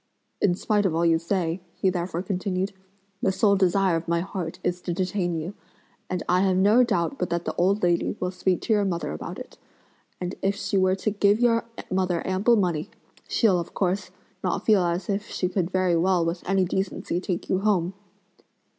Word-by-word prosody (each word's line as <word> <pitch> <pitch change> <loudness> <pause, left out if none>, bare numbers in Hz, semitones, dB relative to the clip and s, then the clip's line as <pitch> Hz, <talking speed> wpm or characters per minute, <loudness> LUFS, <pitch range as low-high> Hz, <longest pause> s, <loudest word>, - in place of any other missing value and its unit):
"In 180 -3 +3
spite 205 +1 +1
of 165 - -2
all 170 +1 +2
you 165 -1 +4
say," 175 0 -1
he 190 - +1
therefore 175 -1 -3
continued, 190 0 -2 0.5
"the 190 - +2
sole 200 +1 +3
desire 190 -1 +3
of 165 +1 -3
my 170 0 +1
heart 180 -3 -5
is 180 0 -1
to 175 - -3
detain 180 -1 -1
you; 170 +5 -5 0.6
and 180 -1 -2
I 180 +1 +3
have 190 -1 +2
no 210 +6 +5
doubt 180 +2 0
but 180 - -1
that 170 0 -2
the - - -2
old 195 +3 +1
lady 175 -1 +1
will 180 0 -1
speak 185 0 0
to 225 - +1
your 205 -1 +3
mother 175 -3 -2
about 75 - -6
it; - - -10 0.6
and 180 0 -3
if 195 +1 +1
she 200 - -3
were 185 -1 +3
to 205 +3 -1
give 205 +1 +3
your 235 -1 +3 0.3
mother 185 -2 0
ample 195 +6 +3
money, 175 -7 0 0.4
she'll, 200 -7 +3
of 170 - -7
course, 190 0 0 0.3
not 185 - -1
feel 210 -4 +5
as 175 +1 -1
if 205 +1 -2
she 180 - -1
could 180 -2 -1
very 185 -2 +2
well 175 0 +2
with 170 +1 -2
any 195 -1 +3
decency 190 -1 -2
take 180 -2 -3
you 185 - +1
home!" 190 -3 +1
185 Hz, 200 wpm, -25 LUFS, 175-195 Hz, 0.6 s, no